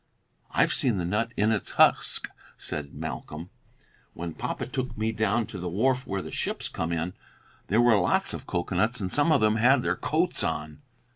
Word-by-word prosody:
"I've -, -, +2 dB
seen 120 Hz, -6 st, +1 dB
the 90 Hz, -, -2 dB
nut 110 Hz, +6 st, -1 dB
in 105 Hz, +2 st, +3 dB
its 110 Hz, -, -2 dB
husk," -, -, +4 dB, 0.3 s
said 75 Hz, -2 st, -5 dB
Malcolm, 80 Hz, +4 st, -6 dB, 0.6 s
"when 85 Hz, -1 st, -5 dB
papa -, -, -4 dB
took 130 Hz, -2 st, -4 dB
me 110 Hz, +1 st, 0 dB
down 110 Hz, +1 st, +1 dB
to 100 Hz, -, -8 dB
the 90 Hz, 0 st, -3 dB
wharf 125 Hz, +8 st, +1 dB
where 95 Hz, -1 st, -2 dB
the -, -, -8 dB
ships -, -, -3 dB
come 80 Hz, +1 st, -3 dB
in. 85 Hz, +2 st, -2 dB, 0.5 s
There 110 Hz, +4 st, +3 dB
were 120 Hz, -2 st, +5 dB
lots 90 Hz, -, +1 dB
of -, -, -7 dB
cocoanuts, 95 Hz, +7 st, 0 dB
and 95 Hz, -3 st, -3 dB
some 150 Hz, +3 st, +4 dB
of 145 Hz, -7 st, +4 dB
'em 110 Hz, +1 st, +3 dB
had 125 Hz, +3 st, +4 dB
their -, -, +1 dB
coats 170 Hz, +3 st, 0 dB
on." 75 Hz, -1 st, -3 dB
105 Hz, 190 wpm, -27 LUFS, 85-120 Hz, 0.6 s, were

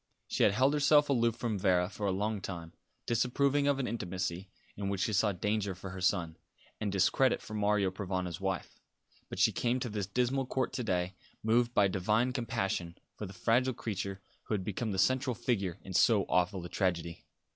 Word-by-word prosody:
She -, -, -2 dB
had 100 Hz, -, +5 dB
held 130 Hz, +6 st, +3 dB
herself 145 Hz, 0 st, +4 dB
aloof 115 Hz, -4 st, +2 dB
from 110 Hz, -5 st, -2 dB
Vera 90 Hz, -2 st, +3 dB
for 105 Hz, +1 st, -4 dB
a -, -, +2 dB
long 105 Hz, +2 st, -1 dB
time, 85 Hz, -3 st, -6 dB, 0.3 s
disapproving 140 Hz, +4 st, +2 dB
of 140 Hz, -1 st, +3 dB
an 135 Hz, -, -1 dB
intimacy 95 Hz, -3 st, -3 dB, 0.3 s
in 100 Hz, -1 st, -3 dB
which 100 Hz, -2 st, -2 dB
she 110 Hz, -, 0 dB
saw 105 Hz, +1 st, +3 dB
danger 100 Hz, +1 st, -1 dB
for 95 Hz, +1 st, -8 dB
her 95 Hz, 0 st, -7 dB
son, 90 Hz, -3 st, 0 dB, 0.4 s
and 105 Hz, -2 st, -1 dB
discredit 100 Hz, +7 st, +3 dB
for 110 Hz, -, -10 dB
Mario 105 Hz, -2 st, +2 dB
Provana's 95 Hz, -2 st, -3 dB
wife; 95 Hz, -4 st, -3 dB, 0.5 s
but -, -, -6 dB
she -, -, +4 dB
came 125 Hz, +1 st, 0 dB
to 125 Hz, -, -3 dB
this 105 Hz, -3 st, -3 dB
dismal 125 Hz, +4 st, 0 dB
court 130 Hz, 0 st, -1 dB
to 125 Hz, -, -2 dB
day 90 Hz, -3 st, -1 dB, 0.3 s
moved 120 Hz, +2 st, +2 dB
by 100 Hz, -, +5 dB
divine 105 Hz, +6 st, +1 dB
compassion 105 Hz, -8 st, -2 dB, 0.2 s
for 105 Hz, -, -6 dB
the 95 Hz, -, -10 dB
fragile 120 Hz, +7 st, +2 dB
creature 100 Hz, -3 st, -4 dB, 0.2 s
who 110 Hz, -, -1 dB
had 95 Hz, -, -3 dB
become 105 Hz, +3 st, -3 dB
the 95 Hz, -, -3 dB
central 130 Hz, +5 st, +2 dB
figure 100 Hz, -7 st, -1 dB
in 95 Hz, -, -8 dB
so 105 Hz, +1 st, +4 dB
awful 90 Hz, 0 st, +1 dB
a -, -, -7 dB
tragedy. 85 Hz, -3 st, -1 dB
105 Hz, 195 wpm, -32 LUFS, 95-120 Hz, 0.5 s, had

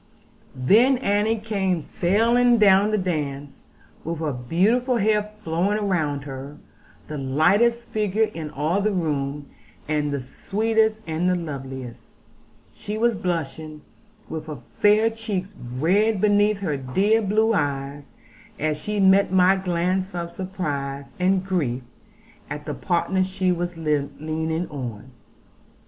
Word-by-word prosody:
Then 225 Hz, -, +4 dB
Annie 215 Hz, -1 st, +1 dB
came 195 Hz, -6 st, -1 dB
sailing 235 Hz, +9 st, +3 dB
down 200 Hz, -1 st, +5 dB
the 215 Hz, -, +1 dB
dance, 145 Hz, -7 st, -4 dB, 0.4 s
with 165 Hz, +1 st, -3 dB
her 155 Hz, -2 st, -2 dB
beautiful 210 Hz, -, +1 dB
hair 210 Hz, 0 st, +1 dB
flowing 195 Hz, +6 st, 0 dB
round 150 Hz, -7 st, 0 dB
her; 140 Hz, +1 st, -8 dB, 0.5 s
the 150 Hz, -1 st, -5 dB
lightest 195 Hz, -, +2 dB
figure 215 Hz, 0 st, +1 dB
in 165 Hz, -7 st, -4 dB
all 155 Hz, +8 st, 0 dB
the 215 Hz, +1 st, +1 dB
room, 145 Hz, -5 st, -2 dB, 0.4 s
and 150 Hz, -1 st, 0 dB
the 140 Hz, -, -1 dB
sweetest, 220 Hz, -, 0 dB
and 165 Hz, +3 st, 0 dB
the 180 Hz, -, +2 dB
loveliest. 135 Hz, -7 st, -7 dB, 0.6 s
She 210 Hz, +1 st, -5 dB
was 235 Hz, +1 st, +2 dB
blushing, 155 Hz, -5 st, -4 dB, 0.4 s
with 160 Hz, -1 st, -6 dB
her 150 Hz, -2 st, -6 dB, 0.2 s
fair 215 Hz, +2 st, +4 dB
cheeks 210 Hz, -4 st, -4 dB, 0.2 s
red 200 Hz, +8 st, +2 dB
beneath 205 Hz, 0 st, +3 dB
her 155 Hz, -7 st, -1 dB
dear 195 Hz, -, +2 dB
blue 220 Hz, +2 st, +2 dB
eyes, 140 Hz, -4 st, -2 dB, 0.5 s
as 150 Hz, 0 st, -1 dB
she 210 Hz, 0 st, -2 dB
met 195 Hz, 0 st, +5 dB
my 190 Hz, 0 st, +5 dB
glance 185 Hz, +1 st, -1 dB
of 170 Hz, -1 st, -4 dB
surprise 145 Hz, -7 st, -4 dB
and 185 Hz, +1 st, +2 dB
grief 140 Hz, -10 st, -1 dB, 0.7 s
at 150 Hz, 0 st, -6 dB
the -, -, -3 dB
partner 185 Hz, +1 st, 0 dB
she 185 Hz, 0 st, 0 dB
was 175 Hz, -1 st, -2 dB
leaning 160 Hz, +2 st, -2 dB
on. 130 Hz, -3 st, -6 dB
180 Hz, 130 wpm, -23 LUFS, 150-205 Hz, 0.7 s, down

